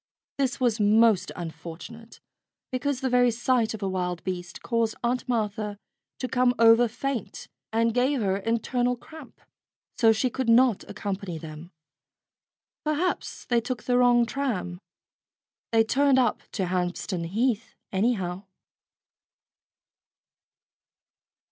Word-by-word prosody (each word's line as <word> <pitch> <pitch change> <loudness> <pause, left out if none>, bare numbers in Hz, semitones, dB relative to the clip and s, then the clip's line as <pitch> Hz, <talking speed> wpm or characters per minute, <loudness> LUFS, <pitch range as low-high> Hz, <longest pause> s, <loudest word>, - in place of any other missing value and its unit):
This 265 -2 0
was 240 -3 +1
most 215 -1 +4
unfortunate, 170 +7 -9 0.5
because 260 +1 -1
the 265 - 0
very 245 0 +5
sight 240 -1 +1
of 210 - -8
a - - 0
wild 180 -2 -2
beast 175 -2 -5
caused 230 -2 0
Aunt 250 +2 -1
Martha 215 -3 -1 0.4
to 255 - -3
come 250 0 +2
over 230 +1 +6
faint 250 +1 -4 0.2
and 230 +1 +2
gave 255 +3 +2
her 195 -3 +1
internal 245 +4 0
cramp. 305 +2 -13 0.6
So 225 -1 +6
she 240 +3 0
could 260 -1 -2
not 235 -2 +4
accompany 200 -4 -4
them. 155 +1 -9 1.1
Perhaps 305 +4 -2
they 240 -1 +2
took 245 +1 -4
the 250 - +1
wrong 245 -1 +5
tram. 225 -10 -3 0.9
They 225 -1 +5
turned 275 +4 +3
up 245 -4 +2
to 190 - -1
Hampstead 180 0 -2
Heath, 225 +4 -1 0.2
anyhow. 190 -3 -1
230 Hz, 120 wpm, -26 LUFS, 195-250 Hz, 1.1 s, over